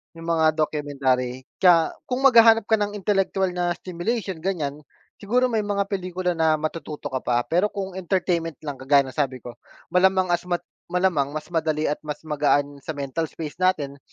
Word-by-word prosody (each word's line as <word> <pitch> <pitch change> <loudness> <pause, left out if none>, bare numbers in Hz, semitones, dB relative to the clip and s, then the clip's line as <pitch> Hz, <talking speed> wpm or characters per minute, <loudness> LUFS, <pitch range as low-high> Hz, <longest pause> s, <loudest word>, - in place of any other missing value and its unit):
'Yung 165 0 -9
mga 160 -2 +3
documentary. 135 -5 -1 0.2
Kaya 170 -3 +5 0.2
kung 255 +1 -2
maghahanap 230 -4 +7
ka 220 +2 +2
ng 205 0 -2
intelektuwal 195 -2 0
na 175 -1 -1
stimulation 190 +1 -3
ganyan, 155 -5 -2 0.4
siguro 250 +5 +1
may 225 - +1
mga 200 -1 0
pelikula 185 -2 -2
na 160 -1 +3
matututo 155 -2 -5
ka 130 - -1
pa. 120 -1 0
Pero 180 +8 +2
kung 195 -2 -5
entertainment 175 -3 -1
lang, 145 -3 -5
kagaya 135 0 +3
sabi 130 -4 -2
ko, 120 - -7 0.4
malamang 185 0 +3
as 175 0 0
mat 175 -1 -1 0.2
malamang 170 -6 0
mas 155 +3 -6
madali 155 -2 0
at 150 - -1
mas 150 0 -7
magaan 145 -2 0
sa 155 +3 -6
mental 145 +3 -3
space 155 +1 -8
natin, 150 -7 0
165 Hz, 170 wpm, -24 LUFS, 145-190 Hz, 0.4 s, maghahanap